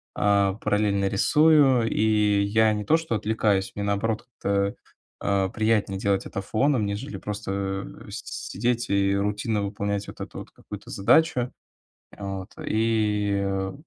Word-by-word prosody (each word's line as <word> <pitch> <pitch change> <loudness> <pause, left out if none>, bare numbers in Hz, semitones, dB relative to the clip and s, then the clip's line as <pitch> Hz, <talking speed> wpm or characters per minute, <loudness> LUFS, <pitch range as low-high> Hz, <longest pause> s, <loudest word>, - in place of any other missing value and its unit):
а, 100 -1 +3
параллельно 105 -2 +1
рисую. 135 +2 +4
И 105 -1 +2
я 110 +1 +3
не 105 0 -3
то 160 - +4
что 160 -8 -3
отвлекаюсь 105 -3 0
мне, 100 - -3
наоборот, 110 +3 -1 0.2
как-то, 100 0 0 0.5
а, 95 -1 +1
приятнее 110 -3 0
делать 100 -1 0
это 100 - -4
фоном, 115 +2 +1
нежели 100 +1 -4
просто 95 -1 -3 0.2
с - - -6 0.3
сидеть 120 +3 -1
и 100 0 +2
рутинно 105 +1 -1
выполнять 100 0 -3
вот - - -10
эту - - -7
вот - - -10
какую-то - - -11
задачу. 125 +3 +2 0.7
Вот. 95 -1 -5 0.2
И, 105 -2 +1
э, 95 0 -2
105 Hz, 140 wpm, -25 LUFS, 100-110 Hz, 0.7 s, рисую